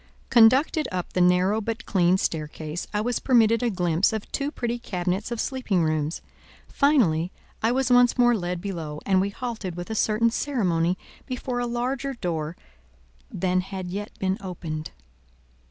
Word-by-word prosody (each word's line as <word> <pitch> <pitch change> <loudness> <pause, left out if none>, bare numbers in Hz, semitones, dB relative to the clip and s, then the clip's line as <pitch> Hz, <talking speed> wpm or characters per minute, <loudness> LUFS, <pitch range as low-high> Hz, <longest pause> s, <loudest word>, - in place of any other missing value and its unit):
Conducted 260 +7 +5
up 180 -2 -4
the 180 - +1
narrow 180 +4 +3
but 230 +2 -4
clean 180 -1 +3
staircase, 155 -1 -3
I 210 - 0
was 245 +2 -1
permitted 230 -3 +4
a 245 - +1
glimpse 180 -2 +1
of 220 -2 -5
two 280 0 -1
pretty 240 -4 -3
cabinets 185 -1 -2
of 235 - -3
sleeping 225 - 0
rooms; 155 0 -1 0.5
finally, 190 - +2 0.3
I 225 - +2
was 260 0 +1
once 245 0 +5
more 240 -1 +5
led 180 -3 -3
below, 165 -6 -5
and 190 -1 +3
we 200 - 0
halted 215 -5 -5
with 175 +4 -6
a - - -1
certain 220 +2 +2
ceremony 185 - 0 0.3
before 250 -1 -3
a 245 - -1
larger 255 +3 -2
door 165 -6 -3 0.7
than 185 +1 0
had 185 -1 -6
yet 205 +2 -4
been 190 0 -1
opened. 160 -5 -5
200 Hz, 160 wpm, -25 LUFS, 175-240 Hz, 0.7 s, Conducted